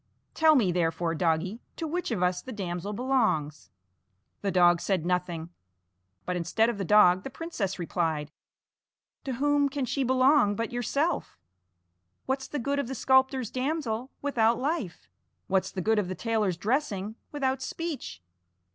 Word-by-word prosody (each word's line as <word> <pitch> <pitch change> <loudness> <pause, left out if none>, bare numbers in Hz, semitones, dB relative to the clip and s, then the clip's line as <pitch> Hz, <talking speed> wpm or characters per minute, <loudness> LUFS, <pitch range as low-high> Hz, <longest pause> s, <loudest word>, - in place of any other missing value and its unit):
Tell 315 -1 +5
me, 215 -10 +3
therefore, 165 -1 0
doggie, 170 +6 0
to 330 - -4
which 345 +3 -2
of 210 -7 -1
us 180 0 +1
the 260 - -8
damsel 185 -2 -4
belongs." 205 - 0 0.7
The 200 - -1
dog 175 -2 +4
said 185 -5 0
nothing, 175 -2 -2 0.7
but 180 - -2
instead 180 +7 +1
of 215 - -8
the - - -1
dog 185 -2 +5
the 270 - -6
princess 240 - -4
replied: 160 -4 -2 0.9
"To 265 - -2
whom 285 +2 +2
can 275 -1 -2
she 275 +2 -1
belong 255 -3 +4
but 230 +2 -2
to - - -14
yourself? 280 +7 -1 0.9
What's 265 0 -2
the 295 - -4
good 280 +2 -1
of 280 - -2
the 265 - -4
sculptor's 265 -3 +2
damsel 255 -3 -2
without 235 -5 +2
life? 255 - -3 0.4
What's 190 0 +1
the 185 - -4
good 220 +4 +2
of 200 - -1
the 185 - -4
tailor's 215 -3 0
dressing 215 - -1 0.2
without 270 -2 -1
speech? 300 - -5
220 Hz, 155 wpm, -28 LUFS, 180-265 Hz, 0.9 s, Tell